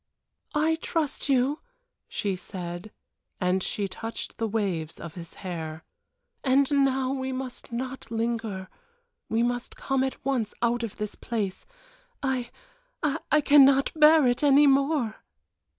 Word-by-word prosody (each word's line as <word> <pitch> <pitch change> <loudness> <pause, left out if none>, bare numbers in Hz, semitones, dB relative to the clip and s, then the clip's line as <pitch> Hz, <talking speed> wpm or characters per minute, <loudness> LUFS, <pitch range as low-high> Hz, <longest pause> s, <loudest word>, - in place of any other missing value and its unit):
"I 315 +2 +2
trust 310 -3 -2
you!" 270 +3 +2 0.5
she 200 -2 -2
said, 180 +1 -7 0.5
and 185 0 +1
she 200 +2 -2
touched 225 +6 -7
the 225 - +1
waves 185 -7 -2
of 170 -2 -7
his 170 -1 -10
hair. 160 -3 -5 0.6
"And 270 +1 +3
now 270 -2 +2
we 265 -1 -2
must 255 -1 -6
not 255 +1 -5
linger 225 -4 -2 0.6
we 225 +1 +2
must 245 0 -2
come 270 -1 0
at 265 -2 -4
once 250 -6 0
out 240 0 +1
of 230 -3 -5
this 210 -1 -3
place. 205 -5 -4 0.6
I 260 -3 -1 0.5
I 300 0 +1
cannot 275 -1 +6
bear 310 -1 +7
it 245 -1 +2
any 290 0 +6
more." 275 -4 +2
245 Hz, 135 wpm, -27 LUFS, 205-275 Hz, 0.6 s, bear